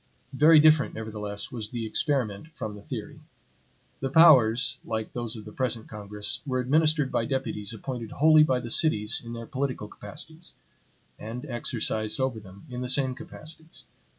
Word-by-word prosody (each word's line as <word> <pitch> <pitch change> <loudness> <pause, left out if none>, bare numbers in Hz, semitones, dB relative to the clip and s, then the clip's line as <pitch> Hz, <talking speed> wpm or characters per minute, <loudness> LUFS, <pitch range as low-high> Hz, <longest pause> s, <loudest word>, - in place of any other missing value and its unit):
Very 155 +3 +7
different, 155 -2 +4
nevertheless, 105 -2 -4
was 110 -4 -5
the 120 -2 -4
experiment 125 -2 -1
from 110 -6 -5
the 105 - -10
theory. - - -7 0.8
The 135 - -2
powers, 135 -5 +6
like 110 -1 -4
those 120 -1 -3
of 110 - -9
the 105 - -9
present 120 -2 -2
Congress, 105 +3 -3
were 130 -1 0
administered 150 +2 +2
by 115 - 0
deputies 115 -5 -3
appointed 115 0 -6
wholly 155 +1 +6
by 130 -4 +3
the 120 -2 -6
cities 110 -9 +2
in 115 0 -7
their 115 0 -6
political 130 -4 -3
capacities; 155 - -8 0.6
and 120 +5 -6
exercised 110 -4 -1
over 130 -4 -1
them 100 +2 -14
in 125 -2 -6
the 125 - -3
same 130 -1 +1
capacities. 160 +2 -10
125 Hz, 160 wpm, -27 LUFS, 110-140 Hz, 0.8 s, Very